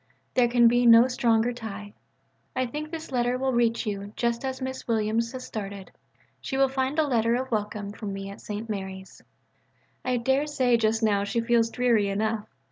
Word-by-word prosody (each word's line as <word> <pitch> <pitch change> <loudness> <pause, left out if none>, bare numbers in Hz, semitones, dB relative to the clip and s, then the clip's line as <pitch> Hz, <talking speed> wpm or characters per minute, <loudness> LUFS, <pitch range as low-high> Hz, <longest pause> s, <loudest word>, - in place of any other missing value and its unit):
There 250 -1 +4
can 240 0 +5
be 245 +1 +4
no 230 +1 +8
stronger 240 -2 +2
tie. 210 -3 -8 0.6
I 255 - +1
think 300 +5 -5
this 320 -3 -7
letter 245 0 +1
will 265 0 0
reach 235 0 +1
you 200 -1 -4
just 235 0 -1
as 265 -1 -3
Miss 260 0 -5
Williams 225 0 0
has 255 -1 -6
started. 200 -2 -7 0.5
She 270 - -4
will 270 0 +4
find 265 +2 -1
a 315 - +3
letter 230 -4 +2
of 260 +1 -3
welcome 210 -2 -2
from 210 -1 -6
me 195 0 -6
at 200 - -11
St. 210 +2 -5
Mary's. 190 -2 -6 0.8
I 255 -1 0
daresay 265 0 +2
just 220 0 +1
now 205 -2 +2
she 205 +3 -1
feels 230 0 +2
dreary 235 -4 +2
enough. 215 +2 -1
235 Hz, 185 wpm, -26 LUFS, 210-255 Hz, 0.8 s, no